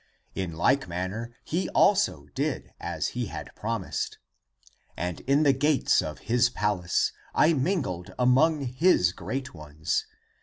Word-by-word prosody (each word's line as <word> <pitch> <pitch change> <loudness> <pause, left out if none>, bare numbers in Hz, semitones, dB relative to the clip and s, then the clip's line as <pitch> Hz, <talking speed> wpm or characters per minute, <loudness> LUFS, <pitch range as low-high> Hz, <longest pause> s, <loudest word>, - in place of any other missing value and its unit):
In 90 -3 -3
like 130 +12 +2
manner 95 +7 -4
he 175 +4 -1
also 195 - +3
did - - -2
as - - -2
he - - -3
had - - -7
promised. 110 -3 -3 0.8
And 90 0 -3
in 140 +3 +4
the 140 -2 +5
gates 145 +2 +3
of 75 -1 -5
his 120 +1 +2
palace 105 -7 0 0.2
I 160 +2 +5
mingled 135 - -1
among 140 +5 +4
his 130 - +3
great 130 +10 -5
ones. 75 -1 -3
120 Hz, 130 wpm, -27 LUFS, 90-140 Hz, 0.8 s, the